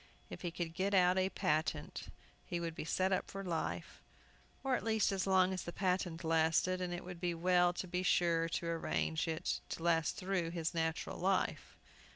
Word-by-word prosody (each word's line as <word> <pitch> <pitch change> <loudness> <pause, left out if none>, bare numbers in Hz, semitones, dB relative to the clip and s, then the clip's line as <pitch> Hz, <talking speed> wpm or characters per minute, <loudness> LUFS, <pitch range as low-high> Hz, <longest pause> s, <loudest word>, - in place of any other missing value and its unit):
If - - -7
he 175 - -2
could 165 -1 -4
get 195 +3 0
out 180 0 +5
a 185 0 +2
patent 155 -6 -1 0.4
he 175 - -3
would 165 -1 -3
be 155 - -5
set 185 +3 +1
up 185 - 0
for 195 0 -5
life, 170 -4 -3 0.6
or 265 -1 +2
at - - -3
least 220 -2 +2
as 195 0 -1
long 190 -1 +4
as 185 - -3
the 175 - -5
patent 180 -2 -1
lasted, 165 +3 +2
and 180 -1 -2
it 175 +1 -4
would 180 -1 -8
be 175 -1 -1
well 175 +1 +4
to 185 - -4
be 180 +1 -1
sure 170 -2 +2
to 170 - -2
arrange 165 -1 -1
it 160 0 -2
to 165 - -5
last 165 -1 +2
through 185 -3 -1
his 165 0 -2
natural 160 -1 -2
life. 190 +1 0
175 Hz, 200 wpm, -35 LUFS, 165-185 Hz, 0.6 s, out